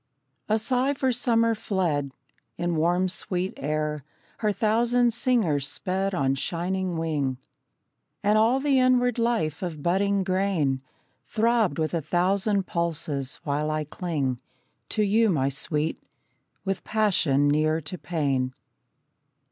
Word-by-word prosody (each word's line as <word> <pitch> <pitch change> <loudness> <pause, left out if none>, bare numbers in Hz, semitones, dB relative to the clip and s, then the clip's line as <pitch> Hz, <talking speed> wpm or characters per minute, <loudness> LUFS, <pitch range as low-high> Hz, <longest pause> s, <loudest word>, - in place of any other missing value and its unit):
A 215 - +3
sigh 255 +5 +1
for 265 -1 +1
summer 230 -1 +2
fled. 175 -10 -1 0.5
In 175 -1 -1
warm, 175 +4 +2
sweet 185 0 -1
air 150 +1 -2 0.4
Her 215 -2 +1
thousand 235 +4 +2
singers 205 - +2
sped 190 +5 -2
on 135 -5 +1
shining 180 +4 -2
wing; 145 -5 -1 0.9
And 210 +1 +3
all 225 +5 +4
the 275 -1 +2
inward 250 -1 +3
life 170 -11 0
of 160 -6 -5
budding 195 +2 +1
grain 185 -8 0 0.5
Throbbed 225 -7 +1
with 155 0 -1
a 165 - 0
thousand 190 +5 +1
pulses, 155 -6 -1
while 150 +1 -1
I 155 0 -1
cling 150 -5 -3 0.5
To 215 - +1
you, 215 +2 +3
my 140 -7 +1
Sweet, 150 +3 -1 0.7
with 195 -1 -2
passion 180 -10 +2
near 155 +2 +2
to 155 +5 -5
pain. 135 -6 -1
180 Hz, 125 wpm, -26 LUFS, 150-215 Hz, 0.9 s, all